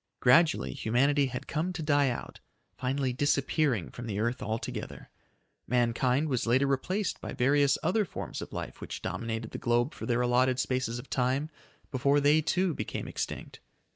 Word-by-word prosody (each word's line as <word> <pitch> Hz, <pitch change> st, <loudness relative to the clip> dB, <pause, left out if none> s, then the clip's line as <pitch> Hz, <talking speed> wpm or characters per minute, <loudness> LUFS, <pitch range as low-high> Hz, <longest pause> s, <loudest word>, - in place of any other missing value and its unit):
Gradually 155 Hz, +6 st, +4 dB
humanity 140 Hz, +5 st, +2 dB
had 125 Hz, -1 st, -5 dB
come 165 Hz, +4 st, -1 dB
to 170 Hz, -3 st, -4 dB
die 145 Hz, -2 st, +3 dB
out, 120 Hz, -, -6 dB, 0.4 s
finally 130 Hz, 0 st, -1 dB
disappearing 140 Hz, -, +1 dB
from 120 Hz, -1 st, -7 dB
the 105 Hz, -2 st, -2 dB
earth 120 Hz, +3 st, -1 dB
altogether. 110 Hz, +2 st, -5 dB, 0.6 s
Mankind 125 Hz, +4 st, +2 dB
was 125 Hz, -5 st, -1 dB
later 130 Hz, +4 st, +4 dB
replaced 180 Hz, +9 st, -1 dB
by -, -, -5 dB
various 140 Hz, +2 st, +3 dB
other 185 Hz, +7 st, +2 dB
forms 190 Hz, -, -6 dB
of -, -, -7 dB
life -, -, -6 dB
which -, -, -6 dB
dominated 115 Hz, -1 st, -3 dB
the -, -, -6 dB
globe 120 Hz, +4 st, +1 dB
for -, -, -7 dB
their 120 Hz, -1 st, +1 dB
allotted 125 Hz, +1 st, +2 dB
spaces 130 Hz, -2 st, -1 dB
of 125 Hz, -, -8 dB
time 130 Hz, +5 st, 0 dB, 0.4 s
before 140 Hz, +2 st, +3 dB
they 145 Hz, +2 st, +4 dB
too 180 Hz, +2 st, +1 dB
became 105 Hz, -, -4 dB
extinct. -, -, -5 dB
130 Hz, 165 wpm, -29 LUFS, 120-145 Hz, 0.6 s, Gradually